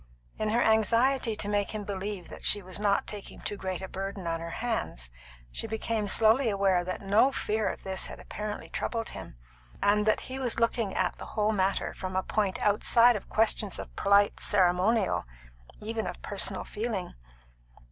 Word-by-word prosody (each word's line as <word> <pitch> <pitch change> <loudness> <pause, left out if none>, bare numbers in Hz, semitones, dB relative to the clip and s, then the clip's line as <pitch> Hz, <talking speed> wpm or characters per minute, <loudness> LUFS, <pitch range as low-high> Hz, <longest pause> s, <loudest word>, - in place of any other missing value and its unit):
In 215 - 0
her 235 +3 +2
anxiety 230 +2 +3
to 205 - -2
make 205 +1 -1
him 210 - -3
believe 195 -2 -5
that - - -10
she 205 - +5
was 185 +2 -5
not 205 -1 +2
taking 205 -2 -7
too 205 - -4
great 190 -2 -4
a - - -4
burden 195 0 -5
on 165 0 -1
her 165 0 -6
hands, 220 - -3 0.4
she - - -3
became 220 -1 -2
slowly 225 +5 +5
aware 195 -3 +2
that 185 +2 -5
no 210 +7 +4
fear 215 -4 -1
of - - -7
this 190 -1 -2
had - - -9
apparently 210 0 -6
troubled 230 -1 -3
him, - - -9 0.4
and 210 +1 +2
that 215 - +3
he 260 +1 -6
was 245 -3 0
looking 230 -3 0
at - - 0
the - - -7
whole 210 0 +3
matter 195 -2 0
from 185 0 -6
a 190 - +1
point 200 -1 -1
outside 230 +3 +5
of 205 - -6
questions 215 -2 +1
of - - -8
polite 200 0 +3
ceremonial, 190 +3 +2 0.6
even 220 +1 -3
of - - -6
personal 200 -1 0
feeling. 210 -5 -4
205 Hz, 180 wpm, -29 LUFS, 195-220 Hz, 0.6 s, she